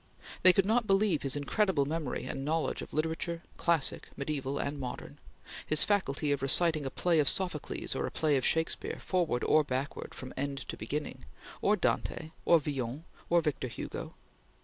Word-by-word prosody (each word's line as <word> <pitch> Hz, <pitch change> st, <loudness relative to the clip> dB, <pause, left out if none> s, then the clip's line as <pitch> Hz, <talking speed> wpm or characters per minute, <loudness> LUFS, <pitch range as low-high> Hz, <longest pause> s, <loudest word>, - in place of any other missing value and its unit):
They 185 Hz, -, +9 dB
could 190 Hz, +1 st, +2 dB
not 225 Hz, +2 st, +2 dB
believe 195 Hz, -4 st, +3 dB
his 135 Hz, 0 st, -1 dB
incredible 145 Hz, +1 st, +1 dB
memory 155 Hz, -3 st, -3 dB
and 135 Hz, -, -4 dB
knowledge 155 Hz, -1 st, -1 dB
of -, -, -8 dB
literature, 165 Hz, +2 st, -2 dB
classic, 165 Hz, -5 st, +1 dB
mediaeval, 140 Hz, -1 st, -2 dB
and 145 Hz, +1 st, -3 dB
modern; 125 Hz, -2 st, -6 dB, 0.4 s
his 155 Hz, -, +4 dB
faculty 155 Hz, -8 st, +1 dB
of 140 Hz, -2 st, 0 dB
reciting 155 Hz, +1 st, +3 dB
a -, -, -1 dB
play 170 Hz, +3 st, +1 dB
of 145 Hz, -, +5 dB
Sophocles 180 Hz, -6 st, -2 dB
or -, -, -2 dB
a -, -, -6 dB
play 155 Hz, -2 st, +1 dB
of 130 Hz, -, +1 dB
Shakespeare, 160 Hz, 0 st, 0 dB
forward 170 Hz, -10 st, 0 dB
or 155 Hz, -, +4 dB
backward, 135 Hz, 0 st, -4 dB
from 130 Hz, -, -8 dB
end 140 Hz, +1 st, -2 dB
to -, -, -3 dB
beginning; 145 Hz, +8 st, -5 dB, 0.4 s
or -, -, +4 dB
Dante, 155 Hz, -, -1 dB
or 170 Hz, -, +6 dB
Villon, 135 Hz, -1 st, -4 dB, 0.3 s
or 170 Hz, 0 st, +4 dB
Victor 150 Hz, -5 st, -2 dB
Hugo. 115 Hz, -, -6 dB
150 Hz, 170 wpm, -31 LUFS, 140-170 Hz, 0.4 s, They